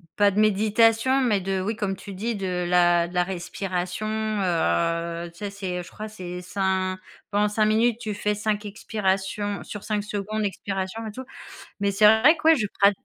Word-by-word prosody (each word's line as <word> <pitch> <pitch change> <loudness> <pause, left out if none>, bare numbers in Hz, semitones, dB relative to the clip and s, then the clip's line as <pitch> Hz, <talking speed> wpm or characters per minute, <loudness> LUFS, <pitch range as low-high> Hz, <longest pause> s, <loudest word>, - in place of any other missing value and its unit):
pas 205 -1 +5
de 200 +2 -1
méditation, 225 +5 +3
mais 210 -6 +2
de, 190 0 -1
oui, 215 +3 -2
comme 200 -3 -2
tu 200 +1 -9
dis, 225 +4 -2
de 180 -2 -2
la 175 -1 +4
de 175 - -12
la 180 0 +2
respiration, 180 +1 -4
heu, 170 - 0
tu 170 - -21
sais, 205 -1 -3
c'est, 185 -3 -4
je - - -12
crois, 215 - -7
c'est 180 -4 -7
cin 185 0 -1 0.3
pendant 205 +1 +2
5 215 +1 +1
minutes, 225 +2 +2
tu 215 -3 -4
fais 210 0 -1
5 210 0 -2
expirations 205 -1 -2
sur 205 - -8
5 210 -1 -1
secondes 210 +1 -3
expirations 195 +2 -3
et - - -5
tout. 255 +5 -7 0.6
Mais 200 0 +1
c'est 205 +2 +3
vrai 220 +10 +7
que - - -12
ouais, 325 - +8
je 220 -8 0
pra 200 0 +7
200 Hz, 195 wpm, -25 LUFS, 185-215 Hz, 0.6 s, ouais